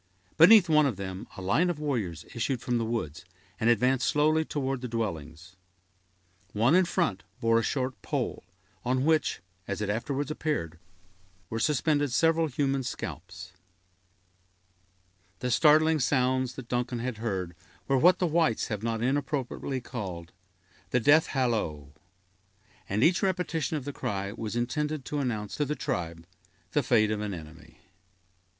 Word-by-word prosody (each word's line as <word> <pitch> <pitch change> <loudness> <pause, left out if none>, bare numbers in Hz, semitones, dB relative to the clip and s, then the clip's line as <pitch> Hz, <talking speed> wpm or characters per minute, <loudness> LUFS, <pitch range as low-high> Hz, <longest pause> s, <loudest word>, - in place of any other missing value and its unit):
Beneath 185 +3 +8
one 155 -2 +5
of 125 - -2
them, 95 -1 -6
a 95 - -6
line 130 - +2
of 175 - -2
warriors 110 - -3
issued 120 +2 -1
from 120 0 -1
the 115 - -1
woods, 110 -10 -3 0.4
and 115 - +2
advanced 125 +2 +3
slowly 155 +2 +3
toward 135 -4 -3
the 125 - -3
dwellings. 90 -6 -5 1.0
One 115 +7 +3
in 185 +1 +5
front 170 - 0 0.2
bore 115 0 +3
a - - -1
short 130 0 -2
pole, - - -3 0.4
on 130 +2 0
which, 160 -1 +2 0.3
as 100 - -3
it 105 -1 -1
afterwards 140 +6 -2
appeared, 85 - -3 0.7
were 110 - -2
suspended 145 0 +1
several 165 +4 +3
human 135 -1 0
scalps. 90 -6 -7 1.9
The 125 0 -2
startling 155 +4 +5
sounds 130 -1 +1
that 130 -2 -9
Duncan 125 0 -1
had 120 -1 -3
heard 95 -6 -3 0.3
were 135 -1 +3
what 180 +5 +6
the 180 - +1
whites 160 -7 +1
have 105 -2 -3
not 115 0 -2
inappropriately 135 -1 -2
called 95 -9 -6 0.6
the 125 - +2
"death 145 +6 +5
hallo"; 95 - -1 1.0
and 105 +4 +1
each 175 +2 +4
repetition 175 -5 -1
of 135 - -6
the 145 - -4
cry 100 -4 -3
was 110 +1 -5
intended 150 +4 -2
to 150 - -3
announce 110 -6 -3
to 150 - +1
the 150 +2 -2
tribe 85 - -4 0.5
the 145 - +2
fate 110 -4 +3
of 105 -1 -2
an 105 -2 -3
enemy. 80 0 -12
125 Hz, 150 wpm, -28 LUFS, 105-150 Hz, 1.9 s, Beneath